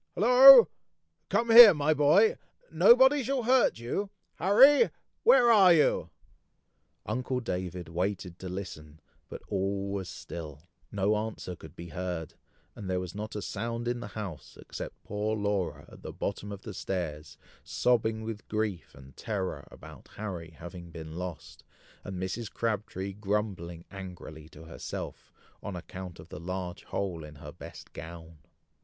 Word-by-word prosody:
hollo! 255 - +9 0.6
Come 235 0 +1
here, 225 -5 +11
my 150 +1 +2
boy! 155 +9 +4 0.4
Nobody 290 - +6
shall 265 0 -1
hurt 255 +2 +3
you! 125 - -3 0.3
Harry! 265 - +6 0.3
where 250 - +6
are 195 -5 +7
you!" 160 -3 +3 1.0
Uncle 125 +3 -2
David 90 -6 -5
waited 90 +1 -3
to 95 - -7
listen, 80 -5 -8 0.3
but - - -9
all 100 0 -2
was 95 -2 -4
still, 75 -3 -9 0.3
no 100 +1 +1
answer 105 -4 -4
could 80 -3 -14
be 85 0 -9
heard, 85 -1 -5 0.4
and 95 - -7
there 90 0 0
was 90 -1 -6
not 105 +2 -6
a 105 - -4
sound 115 +1 -4
in 120 0 -1
the 120 - -7
house, 100 -7 -8
except - - -9
poor 105 +2 -2
Laura 100 -3 -2
at - - -15
the - - -7
bottom 100 +1 -5
of 100 -1 -8
the 105 - -7
stairs, 85 -6 -5 0.3
sobbing 110 -2 0
with 110 -2 -7
grief 105 -6 -3
and 65 0 -15
terror 100 -5 -4
about - - -14
Harry 90 -6 -6
having 85 +2 -11
been 80 -1 -9
lost, 90 -2 -8 0.4
and 95 -3 -6
Mrs. 100 +4 -4
Crabtree 100 -4 -3
grumbling 95 -5 -3
angrily 90 -5 -10
to 80 0 -14
herself, 80 -6 -8 0.3
on 100 - -6
account 90 0 -8
of - - -13
the - - -8
large 90 +2 -6
hole 90 -5 -4
in 75 0 -11
her 70 - -10
best - - -12
gown. 80 0 -10
100 Hz, 150 wpm, -29 LUFS, 85-115 Hz, 1.0 s, here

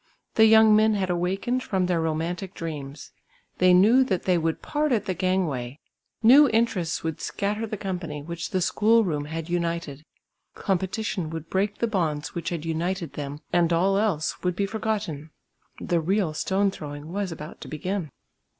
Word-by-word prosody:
The 220 - +6
young 220 -1 +7
men 215 0 +4
had 190 -2 -1
awakened 190 +8 -1
from 190 -6 0
their 175 -2 +1
romantic 165 +4 -3
dreams; 145 -3 -7 0.5
they 185 0 +5
knew 215 +9 +6
that 190 -8 -1
they 185 - +2
would 165 -1 -1
part 300 0 0
at 215 -4 +1
the 190 - -1
gang 185 +1 +1
way, 130 -2 -5 0.4
new 275 +5 +8
interests 220 -8 0
would 160 -1 -3
scatter 210 +3 -2
the 215 - -4
company 175 -7 -5
which 170 +2 -5
the 185 - 0
school 225 +5 +3
room 150 -6 -2
had 160 +1 -5
united; 170 -4 -2 0.5
competition 190 -2 -2
would 160 0 -7
break 200 +2 0
the - - +1
bonds 160 -8 -1
which 170 - -3
had 165 -2 -4
united 165 -1 -2
them 145 0 -6
and 175 -1 +3
all 185 +4 +3
else 195 -7 0
would 180 -1 -1
be 200 - 0
forgotten. 205 -8 -3 0.5
The 175 - 0
"real 185 -1 0
stone 195 +5 +1
throwing" 150 -1 -8
was 200 -2 -2
about 155 -1 -9
to - - -8
begin. 180 +2 -3
180 Hz, 175 wpm, -25 LUFS, 160-205 Hz, 0.5 s, new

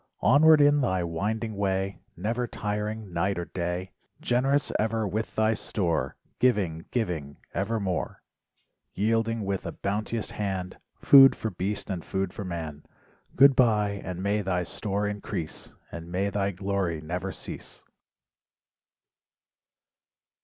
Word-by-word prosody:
Onward 150 +3 +7
in 145 0 +5
thy 95 -8 +1
winding 105 +6 -2
way 95 -1 -1 0.2
Never 115 +7 -1
tiring 105 -2 -4
night 95 +3 0
or 85 - -2
day, 90 +1 -3 0.3
Generous 135 +4 +1
ever 110 0 0
with 110 +3 -3
thy 110 0 +3
store. 85 - -1 0.2
Giving, 95 -10 +1
giving 85 - -2 0.2
evermore. 100 -2 -2 0.7
Yielding 115 +1 +1
with 95 -1 -2
a - - -3
bounteous 105 +2 -3
hand 95 -3 -3 0.2
Food 135 -1 +8
for 110 - -3
beast 95 +3 -3
and 90 -4 -3
food 95 -1 -2
for 105 - -5
man, 80 -5 -5 0.5
Goodbye, 115 -7 +4
and 90 0 -5
may 105 +1 +1
thy 90 -2 0
store 100 +3 -2
increase, 100 -6 -5 0.2
And 85 0 -8
may 100 +3 0
thy 100 0 0
glory 95 -3 -2
never 80 +3 -4
cease. - - -8
100 Hz, 125 wpm, -27 LUFS, 90-110 Hz, 0.7 s, Food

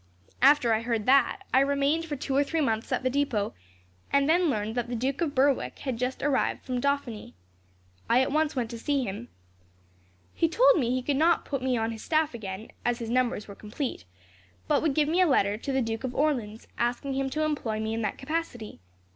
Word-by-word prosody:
"After 265 -3 +5
I 220 - +1
heard 230 -2 -2
that, 275 +9 +3
I 260 - +6
remained 280 +4 +1
for 305 -3 -4
two 270 0 -3
or 285 - +4
three 320 +3 -2
months 225 -6 -1
at - - 0
the 255 - +2
depot, 255 -7 0 0.6
and 280 0 +3
then 340 +1 +3
learned 215 -3 -1
that 240 0 -2
the 245 - -2
Duke 265 +6 -2
of 300 -4 -1
Berwick 275 0 +2
had 260 -4 -2
just 250 +1 -2
arrived 280 -2 0
from 250 -1 -2
Dauphiny. 280 -6 -2 0.7
I 245 +2 +5
at 265 - -2
once 305 0 +1
went 240 -3 -2
to 235 - -6
see 280 +2 0
him. 215 +2 -5 1.1
He 330 - +1
told - - +5
me 240 -4 0
he 255 0 0
could 280 +1 0
not 330 +3 +3
put 275 -3 -3
me 255 -1 0
on 225 0 -1
his 225 -1 -7
staff 310 -3 +1
again, 210 -2 -7
as 240 0 0
his 230 -2 -5
numbers 245 -4 0
were 200 - -8
complete, 215 - -5 0.6
but - - +2
would 310 -4 0
give 300 -1 +3
me 340 +4 +2
a 365 - +5
letter 205 -8 +2
to 235 +6 -5
the 265 -1 +1
Duke 225 +1 -4
of 255 -1 -4
Orleans, 240 -8 -1
asking 245 +3 -1
him 270 0 -1
to 310 +3 -1
employ 270 -8 -1
me 220 0 -2
in 225 - -2
that 210 -3 -2
capacity. 270 -7 -4
260 Hz, 220 wpm, -27 LUFS, 230-290 Hz, 1.1 s, I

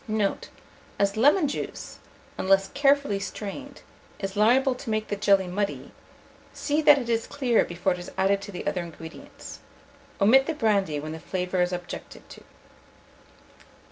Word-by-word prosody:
Note. 215 -2 -1 0.5
As 200 0 +1
lemon 290 - +4
juice, 280 - -6 0.4
unless 195 0 +2
carefully 280 -6 +2
strained, 220 +8 -7 0.3
is 195 0 -5
liable 250 +6 +4
to 250 -1 -8
make 215 0 -1
the 205 - -1
jelly 200 -1 +3
muddy, 200 +3 -3 0.6
see 295 +1 -1
that 295 -1 +7
it 250 -4 -3
is 230 -1 0
clear 255 -5 +2
before 175 +2 -1
it 180 - -7
is 175 - -9
added 195 +1 +2
to 205 0 -8
the 180 - -7
other 180 - -1
ingredients. 165 -1 -10 0.6
Omit 255 +7 +5
the 325 - -2
brandy 200 - +1
when 155 +2 -6
the 160 - -6
flavour 180 +1 -2
is 180 0 +1
objected 175 -1 -7
to. - - -12
205 Hz, 155 wpm, -26 LUFS, 190-260 Hz, 0.6 s, that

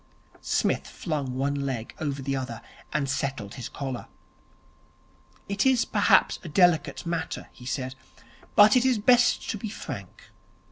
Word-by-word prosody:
Psmith - - 0
flung 145 -7 -3
one 140 +2 0
leg 135 -5 -3
over 140 -3 -3
the 135 +1 -1
other, 125 -3 -5 0.3
and 150 -2 0
settled 130 -6 -2
his 125 - -6
collar. 135 -3 -5 1.4
'It 200 0 0
is 260 -3 +4
perhaps - - +3
a 170 - -7
delicate 175 +1 +3
matter,' 170 -1 -3
he 125 - -12
said, 130 -1 -3 0.6
'but 210 +2 +8
it 250 - +5
is 255 -2 +3
best 245 +3 +4
to 215 - -5
be 220 - -4
frank. 210 - -8
145 Hz, 145 wpm, -26 LUFS, 130-200 Hz, 1.4 s, but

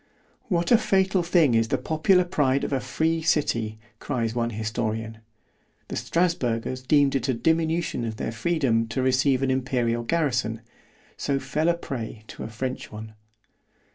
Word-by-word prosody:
What 175 -3 0
a 235 - +7
fatal 190 -3 +2
thing 170 -6 +3
is 115 0 +3
the - - 0
popular 180 +4 +3
pride 140 -6 +1
of - - -2
a 135 - +2
free 160 +6 0
city! 115 -9 0 0.2
cries 115 -5 -2
one 120 0 0
historian—The 110 0 -6
Strasburgers 130 -8 0
deemed 140 +1 +3
it 135 -1 -1
a 130 - +2
diminution 160 0 0
of 110 -1 -3
their 110 - -3
freedom 115 -3 +1
to 130 +3 -2
receive 130 +1 +2
an 135 - +2
imperial 125 -3 0
garrison——so 125 -1 -3
fell 150 +5 0
a 170 - +3
prey 115 -9 -6
to - - -9
a - - -4
French 130 +3 -5
one. 110 0 -8
130 Hz, 150 wpm, -25 LUFS, 115-160 Hz, 0.2 s, a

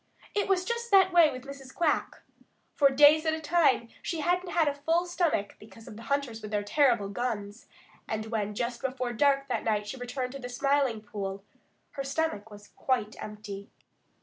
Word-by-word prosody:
It 410 - 0
was 370 -2 +1
just 470 +1 -3
that 380 -3 +5
way 340 -3 +7
with 255 0 -8
Mrs. 275 -1 -10
Quack. 330 -4 0 0.5
For 280 -2 +5
days 295 +3 +6
at 315 - +2
a - - -5
time 295 -8 +2
she 330 -2 -3
hadn't 355 +3 0
had 335 -3 +2
a 290 - +1
full 325 +5 0
stomach 340 - -1
because 225 +1 -15
of - - -9
the 225 - -10
hunters 280 -5 -1
with 210 - -7
their 205 -1 -1
terrible 235 -2 +2
guns, 205 -1 -4 0.4
and 220 0 -3
when 210 -2 -2
just 235 +2 -3
before 255 -2 -2
dark 275 +2 +2
that 240 -4 -2
night 210 -2 0
she 210 +6 -6
returned 250 +1 -4
to 275 - -7
the 245 -1 -7
Smiling 275 -3 +1
Pool, 200 -2 -6 0.5
her 275 - -5
stomach 275 -7 -2
was 205 -1 -13
quite 230 -5 -1
empty. 205 -2 -8
260 Hz, 190 wpm, -28 LUFS, 215-305 Hz, 0.5 s, way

